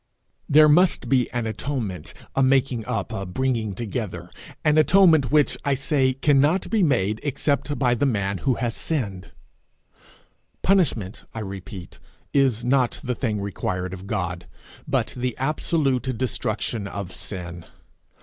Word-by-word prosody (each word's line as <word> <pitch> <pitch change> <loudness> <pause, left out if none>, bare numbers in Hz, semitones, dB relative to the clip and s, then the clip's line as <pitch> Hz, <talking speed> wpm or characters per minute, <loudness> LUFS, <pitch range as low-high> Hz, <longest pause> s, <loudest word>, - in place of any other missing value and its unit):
There 155 +1 +7
must 155 -5 +3
be 130 -3 +2
an 120 -1 -2
atonement, 110 - -4 0.2
a 135 - +2
making 130 -3 +2
up, 115 -6 -2
a 100 - -3
bringing 110 +1 -1
together 95 -6 -5 0.3
an 150 0 +5
atonement 160 -6 +5
which, 150 -1 +3
I 140 -1 +1
say, 135 -1 +1
cannot 145 +6 +2
be 220 -2 +2
made 110 - +2
except 145 0 -1
by 125 -3 +2
the 130 +4 +1
man 100 -5 -1
who 125 +9 +1
has 120 -2 -2
sinned. 100 - -3 1.4
Punishment, 140 - +1
I 110 - -3
repeat, 95 -2 -8 0.3
is 130 -5 +2
not 125 -1 +2
the 125 - -1
thing 110 -4 -2
required 95 -2 -3
of 95 +1 -8
God, 90 -4 -3 0.4
but - - 0
the 125 -1 -3
absolute 135 -3 0
destruction 110 -3 -2
of 100 -2 -6
sin. 85 -3 -6
125 Hz, 140 wpm, -24 LUFS, 100-140 Hz, 1.4 s, There